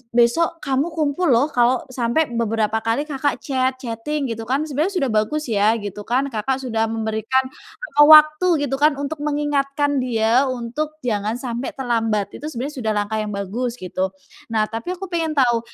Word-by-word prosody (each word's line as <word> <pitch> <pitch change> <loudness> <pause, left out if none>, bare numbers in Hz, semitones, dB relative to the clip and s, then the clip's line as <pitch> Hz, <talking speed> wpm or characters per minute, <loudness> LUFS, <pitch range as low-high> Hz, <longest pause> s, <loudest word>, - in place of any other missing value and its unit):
besok 325 +8 +2
kamu 275 +2 0
kumpul 310 +3 0
loh 270 +3 +3
kalau 245 +1 +2
sampai 240 +4 0
beberapa 220 -1 0
kali, 225 +6 0
Kakak, 285 -1 -1
chat, 260 -1 0
chatting 250 +3 -3
gitu 225 0 -6
kan, 270 +4 +1
sebenarnya 310 +6 -1
sudah 270 -9 0
bagus 215 +9 0
ya 210 +1 +3
gitu 205 -2 -6
kan, 265 +3 0
Kakak, 260 +5 -2
sudah 225 -3 0
memberikan 225 +3 0 0.4
jangka 295 - +4
waktu 305 +3 +7 0.2
gitu 270 -1 -1
kan 300 0 +4
untuk 285 +2 -4
mengingatkan 290 -1 0
dia 240 +1 +2
untuk 255 +5 -3
jangan 215 -1 -1
sampai 245 0 -5
terlambat, 225 -6 -1
itu 300 - -6
sebenarnya 280 +1 -5
sudah 220 -2 -1
langkah 210 +1 -1
yang 210 -1 -3
bagus, 230 +5 -3
gitu. 185 -3 -2 0.5
Nah 215 - +3
tapi 230 +11 -4
aku 380 0 -8
pengen 325 -2 -1
tahu 240 -4 +3
255 Hz, 170 wpm, -21 LUFS, 225-290 Hz, 0.5 s, waktu